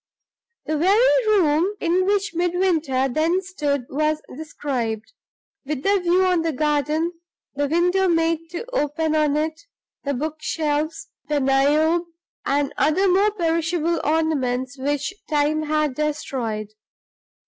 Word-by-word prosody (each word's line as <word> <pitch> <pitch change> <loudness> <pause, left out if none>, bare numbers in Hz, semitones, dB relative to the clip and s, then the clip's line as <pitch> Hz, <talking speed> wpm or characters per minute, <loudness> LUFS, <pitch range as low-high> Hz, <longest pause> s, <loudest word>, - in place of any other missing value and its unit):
The 310 0 -1
very 440 +7 +4
room 365 -1 +3
in 360 +2 +1
which 405 0 +1
Midwinter 335 -6 +1
then 320 +7 +1
stood 295 -8 -2
was 305 +2 0 0.2
described 260 - -4 0.5
with 280 -1 -4
the 400 0 +3
view 360 +1 +2
on 360 -2 +2
the 325 0 0
garden, 300 +3 0 0.4
the 285 0 -1
window 355 +5 +2
made 330 -1 +1
to 350 +6 -5
open 310 - 0
on 300 -1 +2
it, 315 +1 -2 0.4
the 280 -1 -1
bookshelves, 310 +1 -2 0.2
the 295 -1 +1
Niobe, 295 +5 +2 0.4
and 280 0 0
other 355 +6 +2
more 390 +3 +4
perishable 335 -3 0
ornaments 275 -5 0
which 290 +5 -2 0.2
Time 300 0 +1
had 305 -2 0
destroyed. 255 -7 -3
310 Hz, 125 wpm, -22 LUFS, 290-345 Hz, 0.5 s, very